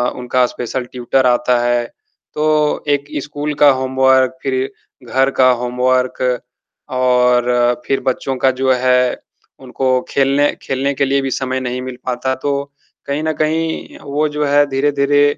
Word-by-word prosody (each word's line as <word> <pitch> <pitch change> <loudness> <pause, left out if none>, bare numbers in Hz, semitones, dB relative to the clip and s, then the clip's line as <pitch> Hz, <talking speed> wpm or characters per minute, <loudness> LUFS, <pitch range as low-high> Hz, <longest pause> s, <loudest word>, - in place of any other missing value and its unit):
उनका 125 0 +1
special 125 +1 -4
tutor 125 +1 0
आता 125 0 +2
है। 120 0 +1 0.5
तो 150 0 +1
एक 145 0 +1 0.2
स्कूल 145 +1 -4
का 145 - +8
होमवर्क 130 0 +2
फ़िर 130 -1 -1 0.4
घर 135 +1 +3
का 130 0 +6
होमवर्क 125 +1 0 0.8
और 125 -1 +2
फ़िर 135 - 0
बच्चों 130 +1 -1
का 130 +1 +3
जो 130 -1 +3
है, 125 0 +2 0.4
उनको 130 0 -1
खेलने 140 +1 +2
खेलने 135 +1 -1
के 140 0 0
लिए 135 +1 +1
भी 135 - -2
समय 130 0 -2
नहीं 125 0 -3
मिल 130 -1 -7
पाता, 130 +1 -1
तो 140 +1 -3 0.3
कहीं 145 +2 -2
न 160 0 0
कहीं 160 +1 -2
वो 145 +2 -1
जो 150 0 -2
है 145 +1 +4
धीरे-धीरे 145 +1 +2
130 Hz, 150 wpm, -17 LUFS, 125-140 Hz, 0.8 s, का